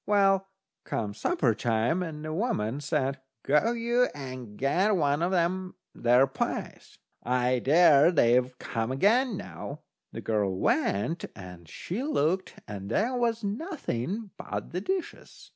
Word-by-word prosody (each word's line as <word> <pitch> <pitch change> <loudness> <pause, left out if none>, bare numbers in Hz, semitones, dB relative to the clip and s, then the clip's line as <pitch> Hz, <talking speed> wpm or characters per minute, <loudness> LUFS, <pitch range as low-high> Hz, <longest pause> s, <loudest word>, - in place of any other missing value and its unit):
Well, 195 -2 +3 0.4
come 105 -3 -3
supper 115 +3 +1
time 140 +9 -1
the 155 0 -4
woman 145 - -1
said: 140 -2 -1 0.2
"Go 150 +12 +3
you, 240 +1 +2
and 130 -6 -8
get 185 +10 +2
one 145 -3 +1
o' 175 - +2
them 185 +1 0 0.2
there 125 +2 +4
pies. 135 - -4 0.2
I 125 +1 +1
dare 150 +1 +6
say 125 -8 +4
they've 125 0 -6
come 115 0 -3
again 215 - +2
now." 90 - -8 0.3
The - - -7
girl 100 -4 0
went 105 - 0
and 90 -3 -11
she 185 - -5
looked, 185 - 0
and 100 -1 -6
there 225 - +1
was 235 -2 0
nothing 205 - -3
but - - -5
the 180 +3 -3
dishes. 370 - -5
150 Hz, 140 wpm, -28 LUFS, 120-200 Hz, 0.4 s, dare